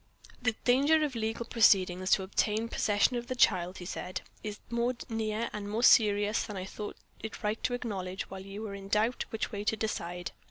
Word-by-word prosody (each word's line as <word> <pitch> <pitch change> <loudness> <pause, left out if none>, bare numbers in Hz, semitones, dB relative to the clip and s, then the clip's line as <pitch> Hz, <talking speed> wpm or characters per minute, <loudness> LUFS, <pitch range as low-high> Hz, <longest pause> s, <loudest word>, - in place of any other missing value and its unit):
"The 230 -2 +2
danger 285 +6 +4
of 295 -3 -1
legal 225 0 -2
proceedings 185 -5 +4
to 190 - +3
obtain 215 +4 0
possession 210 +4 +2
of 240 0 -5
the 255 - -3
child," 185 -6 +3
he 180 - -8
said, 180 0 -4 0.2
"is 210 -1 -4
more 235 +1 +1
near 225 0 -1
and 205 -1 -5
more 220 +3 -1
serious 210 -2 +5
than 210 -3 -6
I 185 - -4
thought 205 +2 -7 0.2
it 220 - -7
right 210 +2 -1
to 245 - +1
acknowledge, 195 -6 -4
while 190 0 -8
you 195 +2 -7
were 210 -2 -5
in 195 0 -8
doubt 215 +4 +1
which 225 - -3
way 205 -1 -4
to 220 - +2
decide. 175 -5 -3
210 Hz, 200 wpm, -30 LUFS, 195-230 Hz, 0.2 s, serious